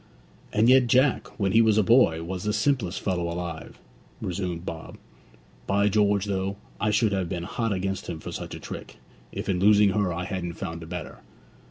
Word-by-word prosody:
'And 110 +2 +3
yet 130 0 +6
Jack, 130 +2 +3
when 100 -2 +1
he 115 - +6
was 110 -2 +4
a 110 - +5
boy, 95 -8 +4
was 90 +1 -5
the 105 0 0
simplest 110 -4 0
fellow 90 -3 -1
alive,' 85 -2 -6 0.4
resumed 90 -2 -4
Bob. 80 -1 -7 0.7
'By 100 +1 +3
George, 105 -1 +2
though, 100 0 -2 0.2
I 105 - +1
should 105 +1 +2
have 95 -3 -1
been 85 -1 -3
hot 115 +5 -2
against 95 0 -2
him 85 -2 -5
for - - -7
such - - -6
a - - -8
trick, - - -8 0.3
if - - -5
in 90 -2 0
losing 105 +1 +5
her 100 -2 0
I 85 +1 -3
hadn't 90 -3 -4
found 85 0 -6
a 80 - -9
better! 90 0 -7
95 Hz, 195 wpm, -26 LUFS, 90-105 Hz, 0.7 s, yet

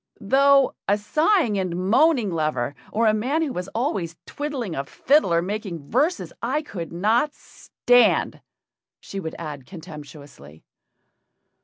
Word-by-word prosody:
"Though 275 +5 +4
a 205 - +3
sighing 300 - +2
and 185 -2 -2
moaning 225 - +3
lover, 155 -6 -1 0.2
or 230 +2 +1
a 215 - +4
man 265 +10 0
who 285 -5 -3
is 180 - -5
always 200 - -2
twiddling 275 - -4
a 135 - -2
fiddle 270 - +2
or 170 0 +2
making 185 -6 -5
verses 300 +9 0
I 270 +6 -1
could 175 - -7
not 220 - +1
stand," 245 0 +1 0.6
she 195 - -7
would 160 -4 -6
add 145 -6 -7
contemptuously. 145 - -12
205 Hz, 135 wpm, -23 LUFS, 170-270 Hz, 0.6 s, Though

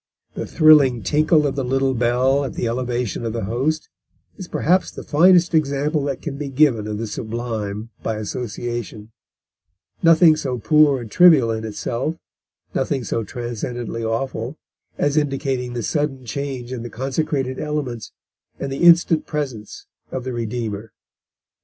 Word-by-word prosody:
The - - -5
thrilling 145 -8 +5
tinkle 155 - +3
of 140 -1 -1
the 135 - -1
little 135 +1 +1
bell 125 +3 +2
at 135 - -5
the 120 - -1
elevation 120 -1 -2
of 115 -1 -3
the 115 - -3
Host 135 +10 -1 0.5
is 185 -3 -8
perhaps 180 +2 +1
the - - -9
finest 175 +3 +4
example 145 -1 +1
that 140 -2 -4
can 140 -3 -4
be 145 -2 -4
given 130 -6 +2
of 105 -1 -3
the 115 - -3
sublime 110 -1 -4
by 110 - -2
association 115 0 -5 0.9
nothing 165 -1 +6
so 130 -5 -3
poor 145 +4 +4
and 110 -3 -9
trivial 155 - +6
in 110 0 -3
itself, 120 +8 -3 0.6
nothing 135 -1 -1
so 115 - -2
transcendently 120 0 -5
awful, 115 +3 -3 0.4
as 145 +1 +1
indicating 135 -4 -1
the 120 -1 -3
sudden 135 -1 -2
change 130 +1 -5
in 125 - -5
the 120 - -6
consecrated 135 +2 -2
Elements, 145 -7 -4 0.5
and 140 - -4
the 135 - -4
instant 170 -2 +5
presence 130 -9 -5 0.3
of 130 - -4
the 130 0 -4
Redeemer." 110 -2 -4
130 Hz, 150 wpm, -21 LUFS, 115-150 Hz, 0.9 s, nothing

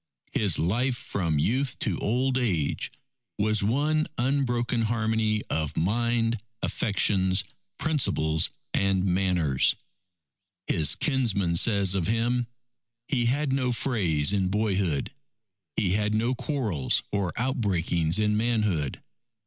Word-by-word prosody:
His 100 -6 +2
life 120 +9 0
from 85 -9 -2
youth 125 - 0
to 100 - -1
old 125 +4 0
age 95 - 0 0.5
was 110 0 +2
one 150 +8 +1
unbroken 120 -2 0
harmony 110 -1 0
of 75 -2 -2
mind, 115 +4 +1 0.2
affections, 95 -2 +2 0.3
principles, 80 - +1 0.2
and 95 -1 +1
manners. 90 -7 +2 0.9
His 80 -3 +2
kinsman 110 - 0
says 100 0 +2
of 95 -4 0
him, 120 +2 0 0.6
"He 125 -5 +1
had 140 +2 0
no 130 -2 +1
frays 95 - +1
in 95 -2 +1
boyhood. 95 -7 0 0.6
He 95 -4 +1
had 105 +2 +1
no 115 +4 +1
quarrels 120 - 0
or 100 -4 -1
outbreakings 95 - 0
in 105 -1 +2
manhood. 105 - 0
105 Hz, 110 wpm, -26 LUFS, 90-120 Hz, 0.9 s, His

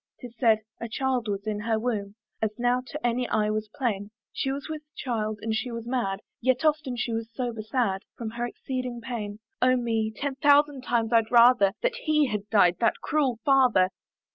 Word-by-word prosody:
'Tis 245 -2 -10
said, 225 -4 +4 0.2
a 230 - -5
child 255 -1 -1
was 200 0 -3
in 215 -1 -2
her 220 +1 0
womb, 215 -3 -2 0.3
As 220 - +2
now 245 +1 +2
to 300 -3 -6
any 240 +1 0
eye 215 -1 +1
was 215 0 -2
plain; 210 -6 -1 0.2
She 270 - -1
was 275 0 -5
with 310 -1 -5
child, 215 -4 -2
and 225 0 -1
she 220 +4 -2
was 230 -1 -6
mad, 235 -6 -1 0.2
Yet 260 +5 +1
often 300 -4 +1
she 240 -1 -2
was 225 0 -3
sober 235 -1 -3
sad 215 -3 0 0.2
From 225 -2 -4
her 240 +1 -3
exceeding 255 -1 -5
pain. 225 -4 -5 0.2
Oh 255 0 +5
me! 225 -3 0
ten 275 +5 -3
thousand 290 -1 +4
times 235 -2 0
I'd 225 -1 +4
rather 235 -4 +6
That - - +2
he 305 -1 +4
had 210 -4 -3
died, 180 -5 +4
that 230 -2 +1
cruel 275 -6 +1
father! 255 -9 +5
235 Hz, 195 wpm, -27 LUFS, 215-255 Hz, 0.3 s, rather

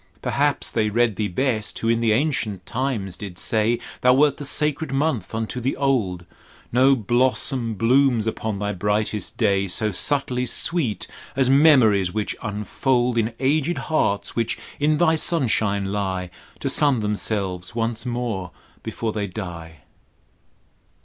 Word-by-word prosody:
Perhaps 145 0 0
they 110 -2 +1
read 115 0 +2
Thee 105 +2 -1
best 110 +2 -1
who 115 - -2
in 115 0 +2
the 115 -1 +3
ancient 110 - 0
time 125 -5 -2
did 95 -4 -7
say 110 +4 +1 0.2
Thou 125 0 +5
wert 140 0 +3
the 145 - -6
sacred 150 +1 -1
month 135 - -1
unto 115 +3 -3
the 130 +3 -1
old: 105 -11 0 0.5
No 130 +3 +5
blossom 120 0 0
blooms 120 +2 +3
upon 110 -2 -2
thy 105 +1 -2
brightest 105 +2 -2
day 100 -3 +2
So 105 +4 -1
subtly 125 +4 -1
sweet 130 - -1 0.3
as 130 -1 +3
memories 125 - +5
which 105 +1 -2
unfold 120 +4 0
In 115 0 0
aged 150 +5 +1 0.2
hearts 100 -9 +1
which 115 -1 0 0.2
in 150 +1 +2
thy 160 -1 +4
sunshine 110 - 0
lie, 95 -3 -2 0.3
To - - -1
sun 140 -6 +3
themselves 100 -3 -3
once 115 0 -1
more 120 -7 -3 0.3
before 110 -2 -3
they 105 -2 -2
die. 85 - -8
115 Hz, 145 wpm, -23 LUFS, 105-135 Hz, 0.5 s, Thou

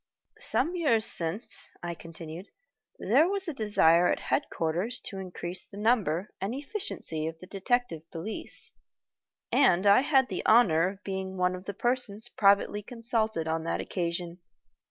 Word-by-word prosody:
"Some 330 +8 -1
years 250 -11 +3
since," 170 +7 0
I 175 0 -3
continued, 165 +2 -9 0.5
"there 330 - +3
was 395 -1 -2
a 325 - -2
desire 180 -7 +4
at - - -1
headquarters 190 - -1
to 195 - -7
increase 180 -1 -5
the 200 - -13
numbers 205 -6 +1 0.2
and 200 +6 -2
efficiency 275 - -3
of 160 0 -6
the 185 - -12
Detective 195 -5 -1
Police, 170 +7 -2 0.8
and 185 -8 +4
I 200 +5 +7
had 270 -3 +3
the - - -3
honor 180 -8 +5
of 200 +1 -11
being 190 -1 -4
one 180 0 +2
of 185 +1 -8
the 200 - -5
persons 240 -2 0
privately 200 0 +3
consulted 225 -6 -2
on 160 0 -1
that - - -1
occasion. 175 0 -3
195 Hz, 150 wpm, -28 LUFS, 170-240 Hz, 0.8 s, I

